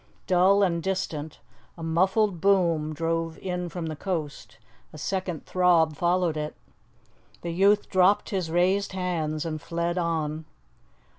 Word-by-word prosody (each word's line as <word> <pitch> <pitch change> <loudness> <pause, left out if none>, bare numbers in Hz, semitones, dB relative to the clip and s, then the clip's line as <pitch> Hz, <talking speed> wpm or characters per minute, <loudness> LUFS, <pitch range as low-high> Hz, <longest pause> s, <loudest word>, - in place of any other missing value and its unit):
Dull 190 +2 +4
and 170 -3 +1
distant, 165 -5 -3 0.4
a 165 - -8
muffled 185 +3 +1
boom 170 -6 +2
drove 165 +1 -2
in 180 -1 -4
from 175 -1 -5
the 155 -1 -4
coast. 160 -3 -5 0.3
A 155 - -11
second 180 +1 -3
throb 170 -4 +3
followed 175 0 +1
it. 150 0 -4 0.9
The 170 - -3
youth 200 +4 +3
dropped 190 +4 +3
his 185 -5 -2
raised 185 +4 +1
hands 170 -4 -2
and 155 -2 -4
fled 170 +1 -2
on. 160 -2 -2
170 Hz, 135 wpm, -26 LUFS, 160-185 Hz, 0.9 s, Dull